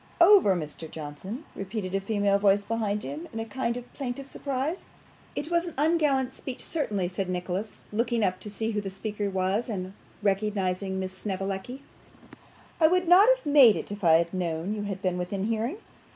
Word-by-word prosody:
'Over, 345 - +7
Mr. 160 -1 -6
Johnson!' 160 - -7
repeated 195 -1 -4
a 195 - +1
female 200 -1 +2
voice 200 0 +4
behind 210 -1 -1
him, 315 +4 -6
in 225 - -5
a 225 - -3
kind 235 +1 -2
of 245 0 -10
plaintive 270 0 -4
surprise. 275 +5 -3 0.5
'It 305 +4 -4
was 340 +1 +2
an 340 - -7
ungallant 290 -4 +2
speech, 260 -2 -7
certainly,' 210 - -1
said 185 +1 -3
Nicholas, 185 +3 -3
looking 230 +1 +1
up 185 -2 0
to 210 - -8
see 220 +2 -2
who 210 -1 -1
the 195 - -4
speaker 205 +1 -3
was, 190 +5 0
and 190 -3 -4 0.3
recognising 195 -2 0
Miss 190 0 -4
Snevellicci. 195 +6 -4 1.0
'I 315 - +7
would 365 +1 +2
not 380 +6 +8
have - - -18
made 280 -7 +7
it - - -5
if 205 0 -7
I 165 -2 +6
had 170 +2 +3
known 175 +1 -2
you 215 - -3
had 200 -1 -5
been 180 -1 0
within 190 +2 -2
hearing. 230 - -1
210 Hz, 185 wpm, -27 LUFS, 190-260 Hz, 1.0 s, not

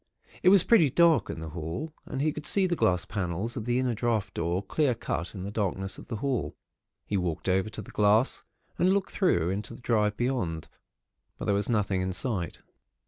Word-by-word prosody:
It 180 - +6
was 190 -2 +7
pretty 175 -11 +5
dark 170 +2 +4
in 80 - -5
the 80 - -6
hall, 85 - -5
and 135 +1 -2
he 155 - +2
could 150 -1 -5
see 195 -2 +4
the 175 -2 +1
glass 90 - +2
panels 100 +3 -3
of 110 - -4
the 120 0 +1
inner 130 -1 +1
draught 110 -4 -1
door, 85 +3 -1
clear 130 +5 +1
cut 90 -4 -4
in 95 - -5
the 100 - -5
darkness 95 -2 -2
of - - -8
the 115 - -4
hall. 130 +2 -2 0.5
He 100 - -1
walked 90 -2 -2
over 95 +2 +2
to 110 - -7
the - - -13
glass, 105 +4 +3 0.4
and 185 +2 +4
looked 200 -1 -1
through 90 - +2
into 105 +4 -4
the - - -14
drive 105 -3 +1
beyond; 115 -11 -2 0.7
but - - -5
there 100 - +2
was 100 +3 0
nothing 100 -4 +1
in 95 0 -2
sight. 95 -2 -3
105 Hz, 210 wpm, -28 LUFS, 95-130 Hz, 0.7 s, was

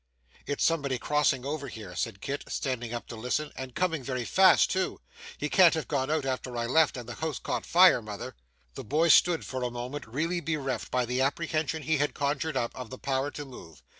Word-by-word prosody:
'It's 145 - -1
somebody 140 -6 +1
crossing 140 -1 +1
over 145 0 -3
here,' 105 -7 -9
said 95 +3 -3
Kit, 140 +1 -4
standing 120 -4 -3
up 120 -1 -4
to 120 - -8
listen, 125 +7 -2
'and 130 -2 -7
coming 170 -5 0
very 130 -2 -3
fast 190 +7 +5
too. 190 0 -1 0.4
He - - -2
can't 180 -4 +6
have 160 - -3
gone 135 -1 -1
out 155 -2 0
after 130 -2 -3
I 120 - -1
left, 150 +3 +3
and 120 -2 -7
the 120 - -6
house 155 +1 -3
caught - - -3
fire, 180 -6 +6
mother!' 110 +3 -7 0.4
The - - -7
boy 155 +8 +2
stood, 170 0 +5
for 130 -1 -4
a 125 - -1
moment, 125 +3 -6
really 160 +9 -1
bereft, 140 -8 -3
by 125 -1 +1
the 125 +2 -1
apprehension 155 +2 -1
he 160 +1 +1
had 145 +1 0
conjured 145 +2 -1
up, 120 - -2
of 125 -3 -7
the 130 - -8
power 135 +1 -1
to 145 0 -7
move. 85 - -13
135 Hz, 215 wpm, -28 LUFS, 125-155 Hz, 0.4 s, can't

